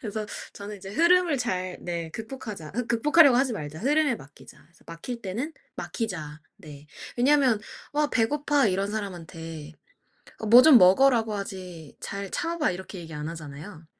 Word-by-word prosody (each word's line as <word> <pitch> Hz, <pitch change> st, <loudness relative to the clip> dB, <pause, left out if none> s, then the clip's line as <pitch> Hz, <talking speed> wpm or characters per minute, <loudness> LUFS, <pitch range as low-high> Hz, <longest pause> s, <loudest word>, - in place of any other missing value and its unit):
그래서 215 Hz, -1 st, -4 dB, 0.3 s
저는 205 Hz, +1 st, -8 dB
이제 195 Hz, 0 st, -10 dB
'흐름을 340 Hz, -, +3 dB
잘 185 Hz, -6 st, -2 dB
네 170 Hz, -2 st, -4 dB
극복하자.' 215 Hz, -, -8 dB
윽 245 Hz, -1 st, -2 dB
'극복하려고 280 Hz, +3 st, +5 dB
하지 260 Hz, -1 st, +2 dB
말자. 155 Hz, -5 st, -6 dB
흐름에 290 Hz, +2 st, +2 dB
맡기자.' 145 Hz, -3 st, -16 dB
그래서 170 Hz, -, -26 dB
'막힐 230 Hz, +9 st, -7 dB
때는 235 Hz, -, -4 dB, 0.2 s
막히자.' 160 Hz, -10 st, -5 dB, 0.2 s
네. 150 Hz, -7 st, -13 dB, 0.3 s
왜냐면 255 Hz, -3 st, +3 dB, 0.3 s
"와 295 Hz, 0 st, +1 dB
배고파" 285 Hz, +4 st, +2 dB
이런 195 Hz, +1 st, 0 dB
사람한테 165 Hz, -6 st, -7 dB, 0.8 s
"뭐 240 Hz, +3 st, +10 dB
좀 300 Hz, -4 st, +8 dB
먹어."라고 225 Hz, +4 st, +5 dB
하지 185 Hz, -6 st, -7 dB
"잘 200 Hz, 0 st, -6 dB
참아 335 Hz, 0 st, -2 dB
봐." 300 Hz, -, +2 dB
이렇게 185 Hz, +1 st, -8 dB
얘기 165 Hz, -1 st, -10 dB
안 150 Hz, +1 st, -5 dB
하잖아요. 160 Hz, +2 st, -9 dB
205 Hz, 335 characters per minute, -26 LUFS, 170-255 Hz, 0.8 s, 뭐